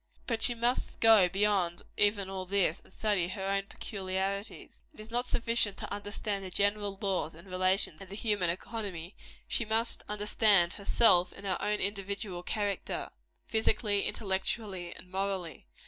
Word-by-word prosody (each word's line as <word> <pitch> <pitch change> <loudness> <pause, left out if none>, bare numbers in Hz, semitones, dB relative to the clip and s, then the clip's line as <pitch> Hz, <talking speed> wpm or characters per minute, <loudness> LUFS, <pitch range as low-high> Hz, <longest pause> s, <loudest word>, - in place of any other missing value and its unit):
But 230 -2 -2
she 240 - +3
must 240 +2 -1
go 220 -5 +6
beyond 195 -3 +1
even 205 -1 +2
all 190 -1 -5
this, 190 -3 +1
and - - -20
study 205 -5 0
her 190 +1 -5
own 195 0 -1
peculiarities. 195 0 -4
It - - -16
is 215 +1 -10
not 245 +1 0
sufficient 230 -4 +1
to - - -4
understand 205 0 -3
the 190 - -5
general 200 +1 +1
laws 190 -6 -1
and 170 +4 -13
relations 185 -2 +3
of 195 - -10
the 195 - -7
human 205 -5 0
economy; 185 -1 -5 0.3
she - - +1
must 225 +1 0
understand 210 -3 +3
herself 195 -3 +4
in 200 - -10
her 185 -2 0
own 210 0 0
individual 200 -2 -3
character 205 +1 -3 0.3
physically, 215 -2 +1
intellectually 190 -2 -2
and 180 - -10
morally. 190 - -3
200 Hz, 155 wpm, -30 LUFS, 185-210 Hz, 0.3 s, go